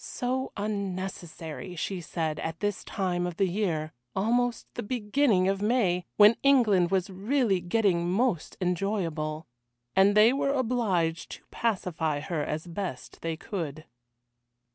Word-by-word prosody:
So 260 Hz, +1 st, -2 dB
unnecessary, 185 Hz, -5 st, -4 dB
she 180 Hz, +2 st, -3 dB
said, 160 Hz, -2 st, -3 dB
at 160 Hz, 0 st, -4 dB
this 205 Hz, -2 st, -2 dB
time 180 Hz, -3 st, -1 dB
of 175 Hz, -1 st, -6 dB
the 195 Hz, -, +3 dB
year, 170 Hz, -5 st, -1 dB, 0.2 s
almost 240 Hz, +4 st, +1 dB
the -, -, -4 dB
beginning 215 Hz, -3 st, +2 dB
of 195 Hz, 0 st, 0 dB
May, 205 Hz, -6 st, +2 dB
when 210 Hz, +2 st, +7 dB
England 220 Hz, -11 st, +4 dB
was 195 Hz, 0 st, 0 dB
really 205 Hz, +1 st, +1 dB
getting 175 Hz, -2 st, +1 dB
most 200 Hz, -4 st, 0 dB
enjoyable. 170 Hz, -4 st, -1 dB, 0.5 s
And 200 Hz, +2 st, +5 dB
they 220 Hz, +4 st, +7 dB
were 275 Hz, 0 st, +1 dB
obliged 215 Hz, -, 0 dB
to -, -, -12 dB
pacify 170 Hz, -9 st, -1 dB
her 155 Hz, 0 st, -2 dB
as 155 Hz, +3 st, -3 dB
best 175 Hz, -6 st, -6 dB
they 165 Hz, -1 st, -3 dB
could. 155 Hz, -5 st, -5 dB
190 Hz, 135 wpm, -28 LUFS, 170-215 Hz, 0.5 s, when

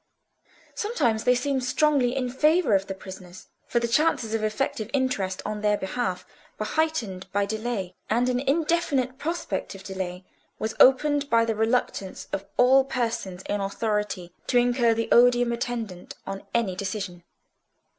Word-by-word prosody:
Sometimes 280 Hz, -, 0 dB
they 250 Hz, 0 st, +5 dB
seemed 265 Hz, +1 st, -1 dB
strongly 260 Hz, -1 st, +2 dB
in 260 Hz, -2 st, -1 dB
favour 305 Hz, -, +3 dB
of 195 Hz, 0 st, +2 dB
the 195 Hz, -, -4 dB
prisoners; 190 Hz, 0 st, -11 dB, 0.2 s
for 240 Hz, -, +1 dB
the 235 Hz, -, -1 dB
chances 235 Hz, -3 st, +1 dB
of 225 Hz, -1 st, 0 dB
effective 215 Hz, 0 st, -1 dB
interest 255 Hz, -9 st, -1 dB
on 210 Hz, 0 st, -3 dB
their 210 Hz, -1 st, +2 dB
behalf 190 Hz, -3 st, -3 dB, 0.3 s
were 215 Hz, -, -2 dB
heightened 235 Hz, -12 st, -1 dB
by 200 Hz, +1 st, +1 dB
delay, 215 Hz, -3 st, -3 dB, 0.2 s
and 240 Hz, +3 st, +2 dB
an 250 Hz, -1 st, +1 dB
indefinite 280 Hz, -2 st, 0 dB
prospect 330 Hz, -, -3 dB
of 195 Hz, -, -11 dB
delay 185 Hz, -2 st, -5 dB, 0.3 s
was 220 Hz, 0 st, -3 dB
opened 285 Hz, +2 st, +5 dB
by 230 Hz, -2 st, +4 dB
the 225 Hz, -, 0 dB
reluctance 220 Hz, -3 st, -1 dB
of 195 Hz, -, -2 dB
all 260 Hz, +2 st, +6 dB
persons 230 Hz, -8 st, -3 dB
in 205 Hz, 0 st, -2 dB
authority 205 Hz, -3 st, -2 dB
to 250 Hz, -, +2 dB
incur 240 Hz, -1 st, +3 dB
the 230 Hz, 0 st, -1 dB
odium 245 Hz, 0 st, +5 dB
attendant 235 Hz, -6 st, -4 dB
on 195 Hz, 0 st, -6 dB
any 225 Hz, -6 st, 0 dB
decision. 190 Hz, -2 st, -4 dB
230 Hz, 155 wpm, -26 LUFS, 200-255 Hz, 0.3 s, all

